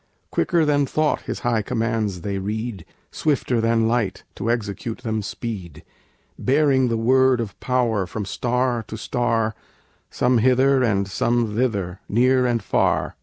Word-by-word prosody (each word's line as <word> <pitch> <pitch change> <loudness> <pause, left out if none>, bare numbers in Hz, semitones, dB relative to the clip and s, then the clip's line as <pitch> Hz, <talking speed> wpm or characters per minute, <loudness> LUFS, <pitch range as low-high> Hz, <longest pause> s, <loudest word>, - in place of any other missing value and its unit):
Quicker 170 -3 +2
than 145 -2 +2
thought 155 +1 0
His - - -3
high 120 -4 +1
commands 110 -4 -2
they 100 +2 -3
read, 105 -1 -4 0.3
Swifter 130 -5 0
than 115 0 +2
light 115 -5 -1
to 115 - -3
execute 110 -1 -2
them 110 -2 -1
speed; 100 - -6 0.6
Bearing 135 -1 +3
the 115 -1 0
word 130 +2 +3
of 110 -5 -3
power 115 -7 0
from 105 +2 -4
star 125 +2 -1
to 110 - -6
star, 115 -2 0 0.6
Some 125 -1 +2
hither 130 +3 +4
and 100 -5 +1
some 115 +2 0
thither, 100 -7 -1
near 125 +3 +3
and 115 -3 0
far. - - +1
115 Hz, 145 wpm, -22 LUFS, 105-125 Hz, 0.6 s, hither